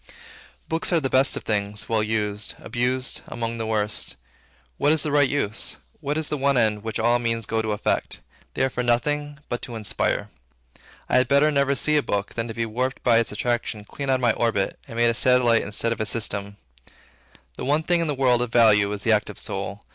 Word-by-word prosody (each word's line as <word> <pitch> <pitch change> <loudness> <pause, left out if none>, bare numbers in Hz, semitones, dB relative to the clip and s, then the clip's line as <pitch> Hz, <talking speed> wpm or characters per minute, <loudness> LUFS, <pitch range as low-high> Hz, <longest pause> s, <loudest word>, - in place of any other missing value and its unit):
Books 165 +3 0
are 170 - +4
the 135 -4 -3
best 130 +1 +3
of - - -6
things, 105 -1 -2
well 110 -1 +1
used; 105 -1 -2
abused, 125 +1 -1
among 115 0 -4
the 110 - -3
worst. 105 -1 -1 0.6
What 145 - +3
is 155 -2 +2
the 150 - -2
right 145 -2 +4
use? 110 -7 -2 0.2
What 150 0 -2
is 160 -1 -1
the 150 - -1
one 140 0 +2
end, 110 -3 +2
which 110 0 -4
all 120 +2 +2
means 115 -2 -1
go 110 +2 -1
to 110 -1 -2
effect? 105 - -1 0.4
They - - +1
are 130 - +2
for 125 - -2
nothing 145 +5 0
but 120 - -3
to 120 - -6
inspire. 110 -2 -1 0.8
I - - +3
had 125 -1 +3
better 140 +3 +4
never 140 -1 +2
see 150 +2 +2
a - - +3
book, 100 -6 -2
than 115 0 -3
to 115 - -5
be 115 - -1
warped 125 +4 -3
by 115 -2 +5
its 115 - -1
attraction 115 0 -2
clean 140 +6 -6
out 130 - +4
of 130 - -2
my 120 -3 +3
own - - -7
orbit, 110 -4 0
and 115 - -8
made 120 0 +4
a - - -2
satellite 125 -1 +4
instead 105 +3 -1
of 115 - -6
a - - 0
system. 100 -3 -2 1.0
The - - -6
one 150 +4 +2
thing 175 +1 +1
in 165 - -1
the 145 - -1
world, 125 -2 +3
of 125 -2 -2
value, 105 -4 +5
is 105 0 -4
the 115 - +2
active 105 -1 +1
soul. - - -5
120 Hz, 225 wpm, -24 LUFS, 110-135 Hz, 1.0 s, by